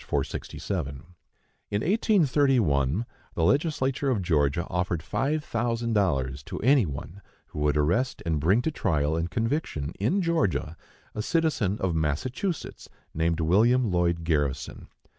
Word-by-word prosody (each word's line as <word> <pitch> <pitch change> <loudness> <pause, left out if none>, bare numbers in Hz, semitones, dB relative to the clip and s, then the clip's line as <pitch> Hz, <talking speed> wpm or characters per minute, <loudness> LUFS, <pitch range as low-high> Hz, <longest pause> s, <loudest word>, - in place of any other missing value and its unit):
467). 70 -9 -3 0.7
In 100 0 -1
1831 130 - +2 0.3
the - - 0
Legislature 140 - +1
of 110 -7 0
Georgia 80 -1 +1
offered 90 -2 -2
five 150 - -1
thousand 115 -1 -1
dollars 70 -10 0
to - - -7
any 130 -4 +4
one 80 +7 -7 0.3
who - - -7
would 75 0 +2
arrest 90 - 0
and 80 -3 0
bring 95 +11 +3
to 160 - 0
trial 75 - 0
and 80 +1 -1
conviction, 110 - -2
in 180 - +1
Georgia, 160 - 0 0.4
a 105 - -3
citizen 145 - 0
of 95 -2 0
Massachusetts, 120 - -2 0.2
named 80 +1 0
William 110 +7 +3
Lloyd 85 -1 +1
Garrison. 75 -5 -1
95 Hz, 130 wpm, -27 LUFS, 80-130 Hz, 0.7 s, any